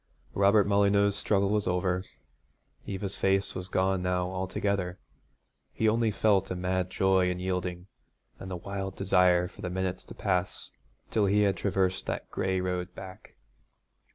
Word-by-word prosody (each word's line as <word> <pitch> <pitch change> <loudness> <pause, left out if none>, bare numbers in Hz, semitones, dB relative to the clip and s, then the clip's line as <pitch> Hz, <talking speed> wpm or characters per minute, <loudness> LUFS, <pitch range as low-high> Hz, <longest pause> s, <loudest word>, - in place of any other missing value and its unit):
Robert 100 +1 +4
Molyneux's 100 0 +3
struggle 100 -1 +2
was 105 -1 +1
over. 90 0 0 0.8
Eva's 100 0 -3
face 95 0 +1
was 90 0 -5
gone 95 0 +1
now 90 0 -1
altogether. 95 0 -2 0.7
He 110 - 0
only 115 +1 +2
felt 100 -2 +2
a 90 - -2
mad 90 0 -1
joy 95 -1 +2
in 90 - -2
yielding, 90 -1 -3 0.5
and 95 - -7
a 90 - -3
wild 95 +1 -5
desire 90 -2 +3
for - - -14
the 90 - -3
minutes 95 0 -3
to - - -11
pass 90 -2 -1 0.4
till 105 -3 +2
he 105 +2 +3
had 100 -1 +2
traversed 95 -2 0
that - - -4
gray 95 0 0
road 90 0 -3
back. 95 +2 -11
95 Hz, 155 wpm, -29 LUFS, 90-100 Hz, 0.8 s, Robert